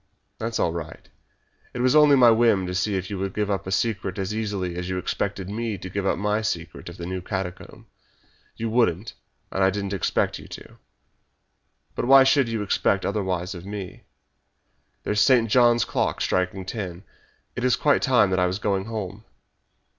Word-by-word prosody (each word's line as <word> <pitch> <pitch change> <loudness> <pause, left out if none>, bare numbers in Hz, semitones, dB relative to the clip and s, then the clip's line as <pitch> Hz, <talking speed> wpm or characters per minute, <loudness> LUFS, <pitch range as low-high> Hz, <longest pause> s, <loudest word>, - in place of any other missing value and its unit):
"That's 115 +1 -2
all 85 - +1
right. 80 -1 -7 0.7
It 125 - -2
was 130 +3 +3
only 150 -2 +7
my 125 -3 +7
whim 115 -4 +3
to 90 - -4
see 95 +3 0
if 95 +1 -4
you 100 - -4
would 95 0 -3
give 105 -1 -1
up 95 -1 -2
a - - -4
secret 95 -2 -1
as 95 +1 -3
easily 100 -5 -3
as 90 +1 -4
you 95 - -2
expected 95 +1 -3
me 110 +1 -3
to 95 -1 -8
give 100 0 -2
up - - +1
my 105 +1 0
secret 85 -5 -4
of 85 - -11
the 85 - -6
new 95 +1 -4
catacomb. 95 -1 -6 0.7
You 115 -1 -3
wouldn't, 110 -3 +1 0.4
and 95 - 0
I 95 - +5
didn't 100 0 -3
expect 95 - 0
you - - -12
to. - - -12 1.1
But - - -3
why 135 0 +8
should 135 -2 +3
you 110 -2 -2
expect 100 -1 +1
otherwise 95 -3 -2
of 85 -2 -9
me? 100 -2 -7 1.0
There's 105 0 +1
Saint 115 -2 +4
John's 120 -1 +4
clock - - -1
striking 95 +1 -1
ten. 95 -3 -6 0.5
It 125 - -4
is 125 -1 +3
quite 145 +2 +2
time 120 -7 +3
that 95 - +1
I 90 - +3
was 90 +1 -2
going 100 -2 -1
home." 105 -2 -6
100 Hz, 190 wpm, -24 LUFS, 95-115 Hz, 1.1 s, why